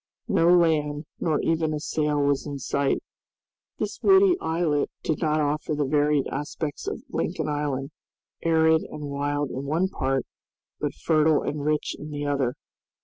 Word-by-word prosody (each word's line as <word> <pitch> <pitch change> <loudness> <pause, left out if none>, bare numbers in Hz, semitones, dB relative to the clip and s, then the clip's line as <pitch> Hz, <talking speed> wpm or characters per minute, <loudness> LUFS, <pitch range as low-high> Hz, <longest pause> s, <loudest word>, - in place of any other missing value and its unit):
No 165 - +3
land 155 -4 +3
nor 160 -3 +1
even 160 -1 +1
a - - -3
sail 150 -1 0
was 140 -1 +1
in 145 -1 -4
sight. 140 +1 0 0.7
This - - -3
woody 385 -1 +6
islet 160 -3 0
did 160 - -1
not 155 -2 +2
offer 150 +1 0
the 145 -1 0
varied 145 0 +2
aspects 145 +1 -4
of - - -4
Lincoln - - -2
Island, 145 -2 -2 0.5
arid 160 -1 +4
and 145 -1 -7
wild 145 0 -1
in 135 +2 -4
one 165 +6 +1
part, 135 -7 -1 0.5
but - - -2
fertile 155 -1 +3
and 145 -1 -3
rich 150 0 0
in 150 - -7
the 145 -1 -4
other. 140 -3 0
150 Hz, 155 wpm, -25 LUFS, 145-160 Hz, 0.7 s, woody